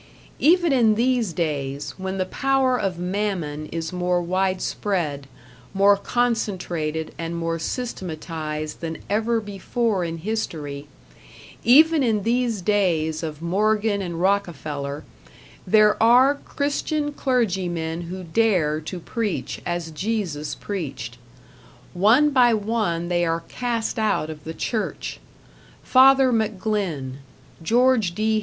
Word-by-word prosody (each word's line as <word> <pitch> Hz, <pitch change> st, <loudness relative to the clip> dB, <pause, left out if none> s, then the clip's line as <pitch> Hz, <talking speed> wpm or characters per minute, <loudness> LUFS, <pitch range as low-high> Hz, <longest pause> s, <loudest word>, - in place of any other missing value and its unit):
Even 340 Hz, 0 st, +4 dB
in 225 Hz, -5 st, +4 dB
these 240 Hz, -3 st, +1 dB
days, 145 Hz, -4 st, -3 dB
when 190 Hz, 0 st, -3 dB
the 185 Hz, -, 0 dB
power 270 Hz, +4 st, +1 dB
of 195 Hz, -7 st, -1 dB
Mammon 180 Hz, -5 st, -2 dB
is 165 Hz, +2 st, -5 dB
more 180 Hz, 0 st, +1 dB
widespread, 180 Hz, -4 st, -1 dB, 0.5 s
more 200 Hz, +1 st, +6 dB
concentrated 190 Hz, -9 st, -2 dB
and 165 Hz, 0 st, -3 dB
more 165 Hz, 0 st, -2 dB
systematized 160 Hz, -7 st, -4 dB
than 165 Hz, -1 st, -4 dB
ever 225 Hz, +2 st, +1 dB
before 205 Hz, 0 st, -1 dB
in 165 Hz, -1 st, -3 dB
history 155 Hz, -7 st, -4 dB, 0.8 s
even 310 Hz, +5 st, +6 dB
in 220 Hz, -5 st, +1 dB
these 235 Hz, -3 st, 0 dB
days 170 Hz, -6 st, +1 dB
of 155 Hz, -1 st, -6 dB
Morgan 205 Hz, +3 st, +1 dB
and 170 Hz, -3 st, -4 dB
Rockefeller, 155 Hz, -7 st, -1 dB, 0.6 s
there 210 Hz, +2 st, +4 dB
are 250 Hz, +5 st, +6 dB
Christian 290 Hz, +1 st, -2 dB
clergymen 180 Hz, -, -1 dB
who 185 Hz, +1 st, -6 dB
dare 170 Hz, -5 st, +1 dB
to 175 Hz, +4 st, -6 dB
preach 215 Hz, +3 st, -3 dB
as 175 Hz, -2 st, -3 dB
Jesus 175 Hz, -4 st, -3 dB
preached. 135 Hz, -, -5 dB, 0.7 s
One 225 Hz, +11 st, +4 dB
by 245 Hz, -4 st, +5 dB
one 210 Hz, -6 st, -1 dB
they 175 Hz, 0 st, +1 dB
are 165 Hz, 0 st, 0 dB
cast 235 Hz, -3 st, -2 dB
out 210 Hz, -8 st, 0 dB
of 150 Hz, -1 st, -11 dB
the 160 Hz, 0 st, -6 dB
Church 220 Hz, -3 st, -3 dB, 0.6 s
Father 265 Hz, 0 st, +6 dB
McGlynn, 200 Hz, -, -1 dB, 0.4 s
George 230 Hz, -1 st, +2 dB
D. 220 Hz, +1 st, +1 dB
190 Hz, 115 wpm, -23 LUFS, 165-225 Hz, 0.8 s, more